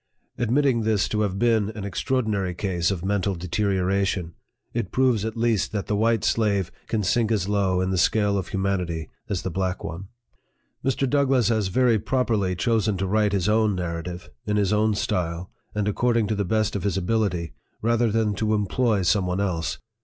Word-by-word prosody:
Vlii - - -48
PREFACE, 120 - -1
Admitting 130 -1 +2
this 110 -2 +1
to 110 - 0
have 100 -2 -1
been 110 -2 +2
an 105 - -5
extraordinary 100 -3 -1
case 85 -3 0
of 95 -2 -3
mental 100 -1 0
deterioration, 95 0 0 0.4
it 115 -6 -2
proves 125 -5 +2
at 110 0 -4
least 115 -3 +1
that 100 -2 -2
the 105 - -1
white 115 +1 +2
slave 100 -5 +1 0.2
can 110 -2 -1
sink 110 +4 +1
as 100 -4 +1
low 95 -3 +1
in 95 0 0
the 95 - +1
scale 105 +2 +2
of 95 -3 -2
humanity 90 -4 -2 0.2
as 95 -4 -2
the 95 - -3
black 95 +1 -2
one. 85 +4 -6 0.8
Mr. 135 +1 +1
DOUGLASS 135 -4 +2
has 110 -4 +1
very 115 +3 +3
properly 110 -6 0
chosen 110 0 +1
to 95 - -1
write 105 +1 +2
his 100 -1 0
own 110 -1 +3
Narrative, 85 0 -5 0.2
in 105 0 +1
his 100 0 +2
own 105 0 +2
style, 90 -2 -2 0.2
and 105 -1 0
according 115 +2 +2
to 110 - -1
the 100 -1 -1
best 110 +3 0
of 100 - -1
his 100 0 -1
ability, 90 -4 -1 0.3
rather 115 0 +2
than 110 -1 +1
to 110 +2 0
employ 105 0 +1
some 95 +1 +2
one 90 +1 -1
else. 90 -5 -1
100 Hz, 190 wpm, -24 LUFS, 95-110 Hz, 0.8 s, very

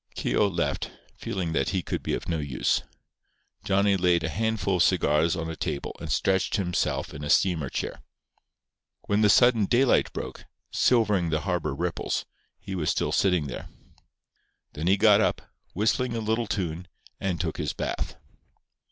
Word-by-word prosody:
Keogh 105 - +1
left, 95 - -2 0.3
feeling 90 -4 -3
that 70 -4 +1
he 95 -2 -1
could - - -3
be - - -1
of - - -7
no 80 -2 -1
use. 70 -4 0 0.8
Johnny 100 0 +3
laid 90 -3 +2
a 80 - -1
handful 105 0 0
of - - +1
cigars 80 -2 +3
on 80 -1 -3
a 80 - -5
table 70 - -4
and - - -5
stretched 95 0 +1
himself 90 -3 -1
in 70 - -7
a 75 - -4
steamer 80 -6 +2
chair. - - -4 1.0
When 100 +1 0
the 105 - +5
sudden 120 -2 +5
daylight 125 +4 +3
broke, - - -7 0.3
silvering 105 -8 +2
the 80 -1 0
harbour 85 -6 -1
ripples, 85 +2 -2 0.3
he 95 - -7
was 85 -5 -1
still - - 0
sitting 90 -6 +2
there. 65 - -7 1.0
Then 80 +3 -3
he 95 +2 +4
got 105 0 +6
up, - - 0 0.3
whistling 115 +5 +1
a - - -1
little 110 +1 -1
tune, 90 -2 -3 0.3
and 95 -3 -2
took - - -2
his - - -2
bath. - - -3
95 Hz, 165 wpm, -26 LUFS, 80-105 Hz, 1.0 s, got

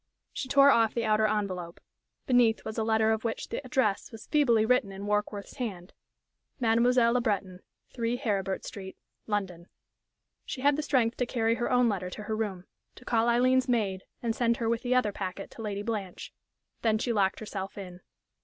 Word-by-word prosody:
She 260 - -5
tore 280 +1 +7
off 225 -3 +3
the 235 -1 0
outer 215 0 +3
envelope; 185 -5 -3 0.5
beneath 245 -4 +3
was 220 +1 -4
a - - +1
letter 220 0 +2
of 220 0 -1
which 230 -1 -3
the - - -4
address 255 -6 0
was 225 -2 -10
feebly 240 -8 +3
written 250 -3 +2
in 195 +1 -7
Warkworth's 210 +1 -2
hand: 195 -8 -5 0.7
"Mademoiselle 235 0 +3
Le 250 - +2
Breton, 195 -5 -2 0.3
3 235 0 -1
Heribert 195 -5 -2
Street, 190 -2 -8 0.3
London." 185 -5 -3 0.8
She 260 - -6
had 285 +1 +4
the 305 - -1
strength 250 -6 +1
to 250 - 0
carry 230 -2 +1
her 240 0 -1
own 250 -1 +4
letter 190 -4 -1
to 210 +3 -8
her 215 +1 -2
room, 200 -5 -3 0.3
to 250 - -15
call 230 0 +2
Aileen's 255 +2 +3
maid 200 -6 0 0.2
and 230 -1 0
send 235 -1 +1
her 230 - -2
with 230 0 0
the 250 0 0
other 250 -5 +2
packet 195 0 -6
to - - -10
Lady 205 -2 -3
Blanche. 205 -5 -5 0.5
Then 220 -2 +2
she 235 +2 -1
locked 195 -2 +1
herself 195 -3 -6
in.... 180 -2 -8
220 Hz, 190 wpm, -29 LUFS, 200-240 Hz, 0.8 s, tore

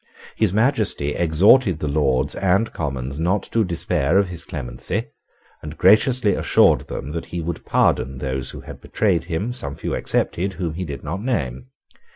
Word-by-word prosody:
His 110 -5 +2
Majesty 110 - +1
exhorted 90 - +4
the 75 - -3
Lords 70 -3 +1
and 100 +4 +1
Commons 70 -2 -4
not 90 +4 +1
to 115 - +2
despair 85 -3 0
of 100 -2 +2
his 85 -2 -7
clemency, - - -4 0.6
and 75 +1 -8
graciously 110 +4 +4
assured - - +3
them 70 - -6
that 85 +1 -5
he 85 - -5
would 85 0 -4
pardon 65 0 +1
those 65 -1 -3
who - - -8
had - - -11
betrayed 90 -7 0
him, 95 +8 -2
some 70 - -6
few - - -4
excepted, 95 +3 -1
whom 85 -4 -3
he 90 +3 -4
did 70 -3 -7
not 85 +6 -4
name. 65 - -2
85 Hz, 170 wpm, -21 LUFS, 70-100 Hz, 0.6 s, exhorted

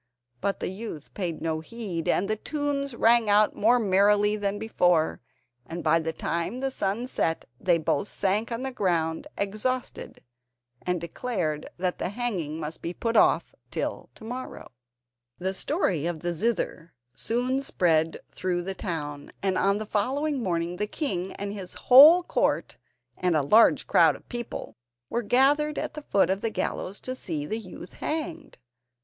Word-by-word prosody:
But 200 - -1
the - - -1
youth 190 -6 -8
paid 170 -5 -4
no 160 -1 -1
heed, 180 -2 -5
and 195 - +2
the 215 - 0
tunes 280 +1 -2
rang 230 -1 +4
out 210 +1 +4
more 235 +4 +4
merrily 205 0 +3
than 205 -1 -2
before, 180 -7 +1 0.4
and 165 +5 -6
by 160 +1 +4
the 160 0 -2
time 170 +9 -3
the 270 0 -1
sun 210 0 -1
set 165 -10 -1
they 175 -2 +3
both 155 +2 0
sank 205 +5 0
on 230 +2 -3
the 265 - -2
ground 170 -8 0
exhausted, 215 +6 -3 0.6
and 180 -1 -1
declared 170 -3 -3
that 180 0 -2
the - - -1
hanging 190 -9 -3
must 155 +1 -6
be 170 +1 -4
put 230 0 -2
off - - +4 0.2
till - - -4
to - - -15
morrow. 250 +3 -7 0.7
The 190 +1 -2
story 190 - 0
of 170 -3 -3
the 175 0 -1
zither 170 -3 -2 0.2
soon 250 +3 0
spread 165 -10 +1
through 180 -1 -2
the 195 +2 -3
town, 150 -7 -5
and 190 -1 +1
on 195 +2 +2
the 215 - -4
following 265 +7 0
morning 175 -3 -1
the 210 - -1
king 190 - -2
and 200 0 -5
his 190 -3 -7
whole 305 +8 +8
court - - 0 0.4
and 180 -2 +1
a 150 - +3
large 215 +11 +5
crowd - - +5
of - - -15
people 240 - -6 0.3
were 235 - 0
gathered 285 +6 +3
at - - -3
the 305 - -7
foot 200 -9 +2
of 195 +1 -1
the 225 - 0
gallows 200 -2 -3
to 255 - -4
see 160 - -4
the 220 +9 -3
youth 185 -3 -10
hanged. 315 -1 -4
200 Hz, 165 wpm, -27 LUFS, 170-240 Hz, 0.7 s, whole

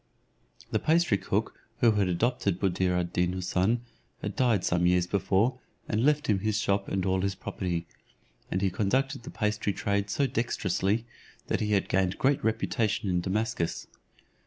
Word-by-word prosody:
The - - +2
pastry 160 - +3
cook - - -2 0.2
who 115 - +5
had 105 -3 +2
adopted 95 0 0
Buddir 95 -1 +1
ad 85 -1 -3
Deen 90 0 +1
Houssun 95 +5 +1 0.4
had - - -3
died 120 -7 +2
some 90 0 +2
years 90 0 +3
before, 100 +6 +1 0.3
and 110 +1 0
left 150 +1 +3
him 105 -3 +2
his 110 +1 0
shop 100 -2 0
and 95 -1 -1
all 95 -1 +1
his 100 0 -1
property, 90 -3 -3 0.6
and 95 +2 -1
he 95 - +2
conducted 130 +8 0
the 120 - -9
pastry 105 -1 -1
trade 100 0 -1
so 140 +7 +1
dexterously, 110 -3 0 0.4
that - - +1
he 105 0 0
had 100 - +2
gained 95 0 +1
great 140 +2 +2
reputation 110 -2 0
in 90 -1 +1
Damascus. 100 -2 -1
100 Hz, 165 wpm, -28 LUFS, 95-115 Hz, 0.6 s, who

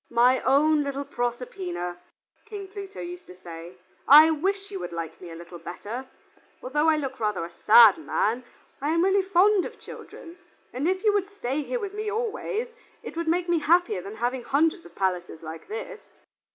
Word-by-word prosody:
"My 245 +2 +4
own 295 +3 +4
little 280 0 -3
Proserpina," 185 -9 -4 0.5
King 410 -3 -7
Pluto 395 0 -8
used 355 +1 -8
to 180 - -12
say, 170 0 -10 0.3
"I 305 +3 +9
wish 390 +6 -2
you 390 - -5
would - - -6
like 165 -1 -6
me 180 - -9
a 165 - -9
little 170 +1 -10
better. 235 +10 -7 0.6
Although 295 +5 +1
I 315 - +3
look 270 -3 -4
rather 210 -6 -1
a 170 - -10
sad 215 +3 +7
man, 235 +4 -1 0.4
I 290 - -1
am 335 - +3
really 390 +1 +3
fond 385 +1 +3
of - - -8
children, 340 +1 -11 0.3
and 265 +6 -1
if 375 +2 0
you 425 -2 +4
would 400 -1 0
stay 290 -8 -3
here - - -3
with 405 -3 -5
me 425 0 -3
always, 455 +1 -3 0.3
it - - -8
would 335 0 -3
make 345 +2 +1
me 345 -1 +2
happier 350 +7 +2
than 405 +2 -8
having 250 - -2
hundreds 285 - +1
of 170 - -21
palaces 180 -4 -2
like 160 +1 -8
this." 445 +2 -6
295 Hz, 190 wpm, -26 LUFS, -, 0.6 s, I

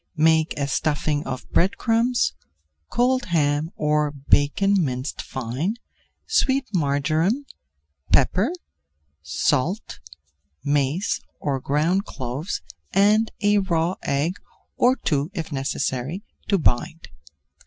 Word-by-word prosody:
Make 160 0 +3
a 140 -1 0
stuffing 150 0 0
of 130 -1 -5
bread 185 +3 +2
crumbs, 235 +2 +2 0.6
cold 250 +1 +2
ham 150 -2 +1
or 150 0 +1
bacon 145 +7 +2
minced 130 -1 -3
fine, 130 - -3 0.5
sweet 275 - +2
marjoram, 160 - +1 0.7
pepper, 185 - +3 0.7
salt, 145 - -1 0.6
mace 145 +5 0 0.2
or 140 -2 -1
ground 160 +9 +1
cloves 135 +7 -4 0.3
and 210 +3 +4
a 205 0 +4
raw 175 -2 +1
egg, 150 +7 0 0.4
or 250 +1 +4
two 145 - -1
if 165 -2 -4
necessary, 135 +4 -2 0.2
to 200 - +3
bind. 160 +1 0
160 Hz, 100 wpm, -23 LUFS, 140-200 Hz, 0.7 s, and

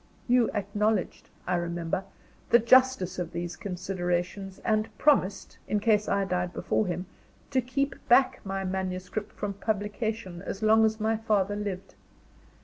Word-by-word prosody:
You 245 -1 +4
acknowledged, 205 0 -1 0.2
I 180 - -1
remember, 170 +2 -2 0.4
the 235 - +8
justice 235 -6 +4
of 175 -1 -4
these 175 +1 -4
considerations 185 0 -3
and 215 0 +1
promised, 235 -10 +2
in 210 - +1
case 210 -1 +2
I 200 0 +1
died 180 -1 -1
before 215 - 0
him, 180 +1 -3 0.5
to 260 -2 +2
keep 275 +3 -1 0.2
back 255 +2 +5
my 195 0 -3
manuscript 190 +2 -3
from 205 -1 -4
publication 205 -2 -3
as 195 +2 -5
long 220 +1 +6
as 220 0 0
my 220 +1 +1
father 205 -3 +1
lived. 200 -2 -5
200 Hz, 140 wpm, -28 LUFS, 185-220 Hz, 0.5 s, the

